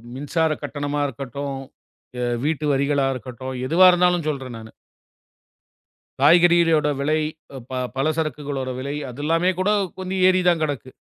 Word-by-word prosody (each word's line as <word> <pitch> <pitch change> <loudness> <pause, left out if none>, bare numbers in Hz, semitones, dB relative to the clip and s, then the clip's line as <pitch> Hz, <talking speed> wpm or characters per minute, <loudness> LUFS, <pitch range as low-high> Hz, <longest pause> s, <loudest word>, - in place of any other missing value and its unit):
மின்சார 155 +4 0
கட்டணமா 145 0 -3
இருக்கட்டும், 135 +2 -5 0.9
வீட்டு 155 0 -1
வரிகளா 140 0 +1
இருக்கட்டும், 130 +1 -7
எதுவா 180 +5 +6
இருந்தாலும் 180 -2 +2
சொல்றேன் 135 -5 -4
நானு. 110 0 -12 1.5
காய்கறிகளோட 165 0 +5
விலை, 155 +3 +1 0.4
அ - - -6
ப - - -8 0.2
பல 135 +3 0
சரக்குகளோட 145 -4 -3
விலை 140 +2 -4 0.2
அதெல்லாமே 165 +7 0
கூடக் 200 -2 +1
கொஞ்சம் 185 0 -2
ஏறிதான் 180 -3 +3
கடக்கு. 140 -3 -4
150 Hz, 120 wpm, -22 LUFS, 135-170 Hz, 1.5 s, எதுவா